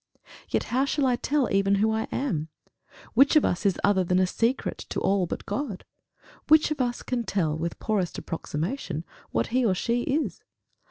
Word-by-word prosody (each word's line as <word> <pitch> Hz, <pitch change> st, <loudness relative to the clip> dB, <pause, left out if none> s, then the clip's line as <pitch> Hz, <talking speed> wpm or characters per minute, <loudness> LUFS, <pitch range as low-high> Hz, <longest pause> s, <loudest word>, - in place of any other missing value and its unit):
Yet -, -, 0 dB
how 260 Hz, +2 st, +3 dB
shall 280 Hz, 0 st, 0 dB
I 250 Hz, -2 st, +3 dB
tell 280 Hz, +1 st, +1 dB
even 195 Hz, 0 st, +3 dB
who 215 Hz, +2 st, +2 dB
I 220 Hz, 0 st, 0 dB
am? 165 Hz, -, -1 dB, 0.7 s
Which 275 Hz, +6 st, +5 dB
of 305 Hz, -, +6 dB
us 180 Hz, +3 st, +1 dB
is 190 Hz, -, +1 dB
other 200 Hz, -2 st, +4 dB
than 180 Hz, +1 st, +1 dB
a 185 Hz, -, +4 dB
secret 230 Hz, +7 st, -1 dB
to -, -, -2 dB
all 195 Hz, -2 st, +1 dB
but -, -, -5 dB
God! 260 Hz, -10 st, -4 dB, 0.6 s
Which 310 Hz, 0 st, +5 dB
of 295 Hz, -3 st, -1 dB
us 245 Hz, -1 st, -1 dB
can 245 Hz, -2 st, -2 dB
tell, 175 Hz, -7 st, 0 dB
with 165 Hz, +1 st, -3 dB
poorest 195 Hz, -5 st, -1 dB
approximation, 165 Hz, -, -4 dB, 0.2 s
what -, -, 0 dB
he 255 Hz, 0 st, +3 dB
or 200 Hz, -5 st, +2 dB
she 235 Hz, +6 st, 0 dB
is! 295 Hz, +5 st, -1 dB
220 Hz, 185 wpm, -26 LUFS, 185-260 Hz, 0.7 s, of